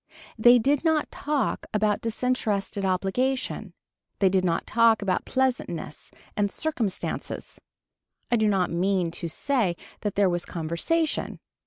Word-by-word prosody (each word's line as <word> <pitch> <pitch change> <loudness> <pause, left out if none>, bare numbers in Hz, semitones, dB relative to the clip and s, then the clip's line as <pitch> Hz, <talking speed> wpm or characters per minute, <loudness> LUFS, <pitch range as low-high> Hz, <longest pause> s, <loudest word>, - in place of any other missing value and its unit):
They 240 +2 +7
did 275 +5 +2
not 320 -2 +1
talk 290 -2 -1
about 210 -1 +2
disinterested 220 -4 -1
obligation. 195 +1 -1 0.4
They 195 - +4
did 185 0 +2
not 170 -2 0
talk 230 -2 +4
about 190 -2 0
pleasantness 250 - -2 0.3
and 205 -1 +1
circumstances. 235 -8 -3 0.7
I - - +5
do 220 -1 +2
not 195 -3 +1
mean 180 0 +1
to 170 - -5
say 210 - 0 0.3
that 205 -2 -2
there 200 -1 +4
was 175 -1 0
conversation. 170 - -1
210 Hz, 130 wpm, -26 LUFS, 185-255 Hz, 0.7 s, They